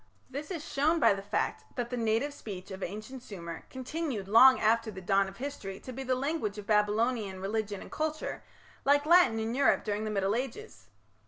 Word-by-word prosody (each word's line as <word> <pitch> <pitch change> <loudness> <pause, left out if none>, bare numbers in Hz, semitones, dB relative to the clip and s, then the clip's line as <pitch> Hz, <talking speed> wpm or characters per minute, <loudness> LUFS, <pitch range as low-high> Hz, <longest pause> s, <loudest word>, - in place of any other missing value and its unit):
This 285 +3 -5
is 335 -4 -5
shown 310 +4 +2
by 280 - +5
the 195 - -5
fact 200 - -2
that 245 -1 -3
the - - -1
native 230 +5 0
speech 195 -7 -8
of 190 0 -7
ancient 215 +8 -6
Sumer 170 -7 -8
continued 260 -5 -4
long 255 +5 +8
after 225 +1 +2
the 190 -3 -7
dawn 195 +2 +2
of 195 +1 -10
history 240 -8 -6
to 255 - -8
be 265 - -6
the 260 -1 0
language 260 -6 -2
of 210 - -7
Babylonian 210 -1 +1
religion 205 +1 -2
and - - -13
culture, 310 0 -3 0.4
like 285 +1 +4
Latin 330 -9 +6
in 225 +1 -2
Europe 275 +2 +3
during 210 0 -2
the 215 - -2
Middle 200 -1 0
Ages. 265 - -5
225 Hz, 195 wpm, -30 LUFS, 205-270 Hz, 0.4 s, long